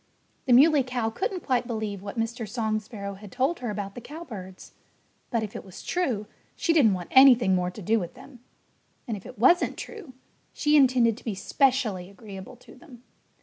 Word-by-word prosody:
The 250 - +5
Muley 290 +3 +6
Cow 245 -3 -2
couldn't 375 - -3
quite 250 -2 +1
believe 215 -4 -4
what 200 +3 -8
Mr. 225 -1 -3
Song 220 -1 -1
Sparrow 205 -2 -7
had 200 0 -12
told 270 - 0
her 245 - -4
about 200 -1 -4
the 245 - -9
cowbirds. 220 - -10 0.6
But 230 -3 0
if 210 - -7
it - - -6
was 190 -2 -12
true, 255 - -1 0.3
she 335 - +1
didn't 235 -12 +5
want 175 -2 -7
anything 250 -7 +7
more 180 -1 +1
to 195 +3 -10
do 225 +5 +2
with 175 +4 -6
them. 260 0 -14 0.7
And 225 - -2
if 195 - -10
it - - -12
wasn't 300 - +4
true, 425 - -9 0.4
she 295 0 +2
intended 250 -5 +4
to - - -14
be 220 -4 -3
specially 220 -4 0
agreeable 195 +1 -10
to 245 - -17
them. 255 -3 -16
230 Hz, 190 wpm, -26 LUFS, 200-265 Hz, 0.7 s, anything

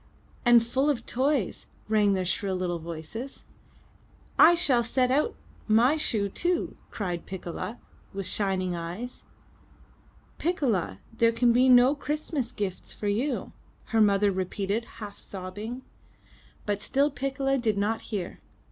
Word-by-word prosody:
*' - - -32 0.2
'*And 240 -1 +7
full 265 +5 +1
of 245 -5 -1
toys!*' 265 -4 0 0.2
rang 210 -2 +3
their 185 -1 0
shrill 190 +1 -1
little 180 -2 -2
voices. 170 - -7 0.9
'1 345 - +8
shall 275 -9 +2
set 250 +2 +1
out 300 - +2 0.3
my 235 +7 +5
shoe 220 -9 0
too!" 345 - -1
cried 180 -5 -4
Piccola 190 +4 -5 0.3
with 195 0 -5
shining 185 -3 -1
eyes. 175 +9 -6 1.1
'Ticcola, 235 - 0 0.2
there 230 0 +4
can 235 +1 +3
be 255 +2 +5
no 250 +2 +7
Christmas 295 -3 -3
gifts 200 -6 -4
for 210 - -5
you!" 230 +8 -1 0.4
her 225 - +5
mother 205 -1 +4
repeated 195 +4 -2
half 205 -2 -8
sobbing. 205 +7 -6 0.8
But 205 -1 -1
still 280 +5 +2
Piccola 270 0 -1
did 220 -4 0
not 220 +3 0
hear. 200 -6 -5
225 Hz, 135 wpm, -27 LUFS, 195-260 Hz, 1.1 s, 1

